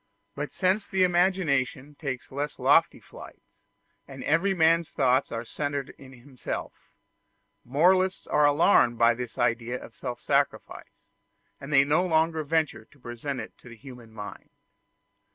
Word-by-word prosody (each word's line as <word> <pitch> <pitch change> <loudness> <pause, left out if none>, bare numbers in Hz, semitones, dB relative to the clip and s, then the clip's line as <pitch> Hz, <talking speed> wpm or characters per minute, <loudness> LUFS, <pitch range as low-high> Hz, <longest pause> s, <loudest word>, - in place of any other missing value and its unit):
But - - -5
since 195 +2 0
the 190 -1 +1
imagination 175 -7 +1
takes 140 -4 -6
less 145 +2 -4
lofty - - +3
flights - - -15 0.5
and - - -9
every 185 +6 +1
man's 165 0 +3
thoughts 130 -1 +1
are 115 0 -4
centred 145 +1 -4
in 135 -1 -15
himself, 130 +1 -7 0.9
moralists 185 +8 +2
are 150 0 +3
alarmed 145 -5 +4
by 115 0 +4
this 125 0 -7
idea 120 +2 -1
of - - -12
self 125 -2 -6
sacrifice, - - -2 0.6
and 140 +2 -9
they 135 -1 +6
no 150 +5 +2
longer 160 -2 +1
venture 155 +1 -1
to 145 - -25
present 125 +3 -6
it - - -10
to 125 - -15
the 115 - -11
human 120 -2 -13
mind. 105 -2 -10
145 Hz, 145 wpm, -26 LUFS, 125-165 Hz, 0.9 s, they